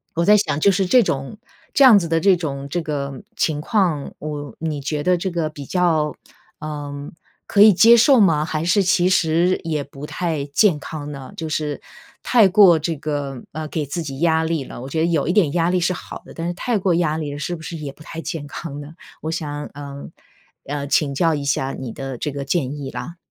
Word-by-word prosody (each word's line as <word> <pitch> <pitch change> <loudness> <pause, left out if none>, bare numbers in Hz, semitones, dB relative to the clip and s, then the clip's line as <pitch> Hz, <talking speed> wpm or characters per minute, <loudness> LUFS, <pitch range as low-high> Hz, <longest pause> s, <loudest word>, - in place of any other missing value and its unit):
我 170 - +1
在 210 +2 +7
想 155 -7 0
就 200 - +4
是 195 0 +1
这 245 +7 +5
种 135 +6 -3 0.4
这 280 - +5
样 250 -6 +9
子 170 - -3
的 165 0 +1
这 190 +3 +4
种 140 -5 -4
这 175 +3 -1
个 140 -2 -4
情 150 -2 0
况， 170 -6 0
我 145 -4 -6
你 155 -3 -3
觉 145 +2 -2
得 180 0 +3
这 185 +1 -3
个 165 -2 -1
比 145 -2 -9
较， 160 -4 +1 0.5
呃， 145 -2 -6 0.4
可 200 - +3
以 215 -1 +8
接 230 +6 +7
受 260 +2 +6
吗， 160 -7 +4
还 155 -1 -2
是 200 +3 +3
其 180 0 +3
实 175 +1 +2
也 155 -3 -2
不 140 +1 -10
太 160 -3 -2
健 155 +4 +3
康 150 0 -7
呢？ 135 -2 -9
就 160 -1 -4
是 150 -2 -2 0.4
太 230 -5 +5
过 190 -3 +6
这 160 +2 -2
个， 140 -3 -4
呃， 155 +1 -4
给 150 0 -3
自 145 +5 -4
己 135 -3 -6
压 160 -1 +2
力 160 -3 -1
了， 120 - -9
我 130 - -7
觉 160 - -2
得 160 - +3
有 165 -4 0
一 175 - +1
点 185 -8 +3
压 170 -1 +2
力 180 0 +2
是 175 +1 +1
好 - - -9
的， - - -12
但 165 +1 -4
是 175 - -2
太 230 +5 -1
过 190 -2 +1
压 160 -2 +1
力 150 -2 -4
了 145 - -6
是 175 +4 -3
不 160 - -11
是 165 - -6
也 150 -3 -6
不 145 - -20
太 165 +1 -7
健 155 -3 -5
康 145 0 -7
呢？ 145 +2 -10 0.3
我 160 - -4
想， 150 -2 -4
呃， 140 0 -8 0.6
嗯， 140 0 -4
请 145 -2 +2
教 165 0 +2
一 145 - -4
下 135 -1 0
你 130 -3 -6
的 135 -1 -6
这 150 +4 -3
个 140 0 -5
建 140 -1 -1
议， 140 -2 -5
啦。 170 - -7
155 Hz, 245 characters per minute, -21 LUFS, 145-175 Hz, 0.6 s, 样